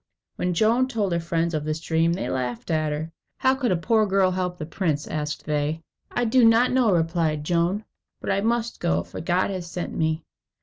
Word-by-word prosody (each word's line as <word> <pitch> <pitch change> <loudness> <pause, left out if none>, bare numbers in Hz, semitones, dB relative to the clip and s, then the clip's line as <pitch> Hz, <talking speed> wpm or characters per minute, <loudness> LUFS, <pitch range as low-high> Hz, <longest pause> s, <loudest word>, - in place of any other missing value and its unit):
When 180 -1 -1
Joan 230 +7 +3
told 215 -7 -1
her 170 - +1
friends 165 0 -1
of 155 -1 -1
this 155 +1 -2
dream, 165 +1 +1
they 185 - -3
laughed 125 +1 -3
at 155 -1 +1
her. 155 +2 -4 0.3
"How 260 0 +3
can 260 -5 0
a 180 - +2
poor 215 +5 +2
girl 190 -1 +3
help 180 -1 -2
the 155 - -5
prince?" 155 -3 -1
asked 150 -1 -4
they. 150 +2 -1 0.3
"I 245 - 0
do 245 +2 +4
not 230 +2 +5
know," 250 -4 +3
replied 165 -3 +1
Joan; 175 +6 0 0.3
"but - - -2
I 195 - +1
must 235 +1 -1
go, 80 +1 +1
for 85 - -8
God 180 +4 +1
has 180 -3 -5
sent 175 0 -5
me." 160 0 0
170 Hz, 210 wpm, -24 LUFS, 155-210 Hz, 0.3 s, not